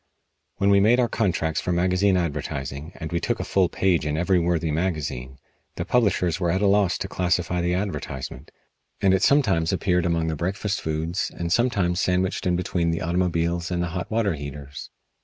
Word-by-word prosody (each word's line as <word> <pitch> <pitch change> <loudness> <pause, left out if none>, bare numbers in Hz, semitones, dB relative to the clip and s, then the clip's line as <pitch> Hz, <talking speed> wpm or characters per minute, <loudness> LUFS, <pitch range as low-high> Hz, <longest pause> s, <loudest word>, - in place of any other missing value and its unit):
When 100 0 +2
we 100 - +6
made 115 +5 +4
our 120 - +3
contracts 80 -8 0
for 90 - -2
magazine 90 +2 +2
advertising 75 -2 -3
and 80 0 -6
we 85 - 0
took 120 +6 -1
a - - -2
full 95 -3 +2
page 90 -2 +1
in 75 0 -1
every 90 +2 +2
worthy 85 -2 0
magazine 75 -6 -3 0.4
the - - -3
publishers 95 -8 +1
were 90 -2 0
at 95 +4 +1
a - - +4
loss 100 -2 +3
to - - -4
classify 90 -1 0
the 90 +1 0
advertisement, 75 -8 -5 0.5
and 95 -1 +3
it 95 - +2
sometimes 100 - +3
appeared 90 -2 +1
among 85 -1 0
the 80 -1 -1
breakfast 95 +5 -2
foods, 80 +3 -2
and 85 0 -1
sometimes 100 -7 +1
sandwiched 90 0 0
in 90 - +2
between 85 -1 -1
the 80 - -1
automobiles 85 0 0
and 90 -1 -1
the 85 - -2
hot 90 +1 -4
water 110 -4 +1
heaters. 70 -1 -8
90 Hz, 190 wpm, -24 LUFS, 80-95 Hz, 0.5 s, we